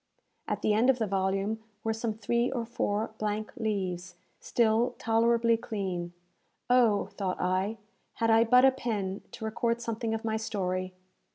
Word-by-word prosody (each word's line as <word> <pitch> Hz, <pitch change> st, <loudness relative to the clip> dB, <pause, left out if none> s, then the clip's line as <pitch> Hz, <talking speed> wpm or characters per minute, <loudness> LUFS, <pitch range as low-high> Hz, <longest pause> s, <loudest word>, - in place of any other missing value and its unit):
At -, -, -2 dB
the 215 Hz, -, +3 dB
end 230 Hz, +5 st, +3 dB
of 265 Hz, -, +4 dB
the 225 Hz, -, 0 dB
volume 195 Hz, +2 st, -1 dB, 0.2 s
were 225 Hz, -, 0 dB
some 225 Hz, -1 st, -2 dB
three 235 Hz, +3 st, 0 dB
or 235 Hz, -3 st, -2 dB
four 220 Hz, -2 st, -1 dB
blank 215 Hz, 0 st, -2 dB
leaves, 185 Hz, -5 st, -3 dB, 0.2 s
still 235 Hz, +1 st, +2 dB
tolerably 230 Hz, +1 st, +3 dB
clean. 185 Hz, -6 st, -4 dB, 0.6 s
"Oh," 235 Hz, -5 st, +4 dB
thought 190 Hz, -3 st, -2 dB
I, 190 Hz, +4 st, 0 dB, 0.4 s
"had 225 Hz, 0 st, +1 dB
I 225 Hz, +1 st, +6 dB
but 250 Hz, +3 st, +6 dB
a 265 Hz, -, +7 dB
pen, 210 Hz, -7 st, -3 dB
to 220 Hz, -, -6 dB
record 230 Hz, +1 st, 0 dB
something 230 Hz, -1 st, -2 dB
of 225 Hz, -, -5 dB
my 220 Hz, -1 st, 0 dB
story!" 185 Hz, -4 st, -2 dB
220 Hz, 160 wpm, -29 LUFS, 195-230 Hz, 0.6 s, a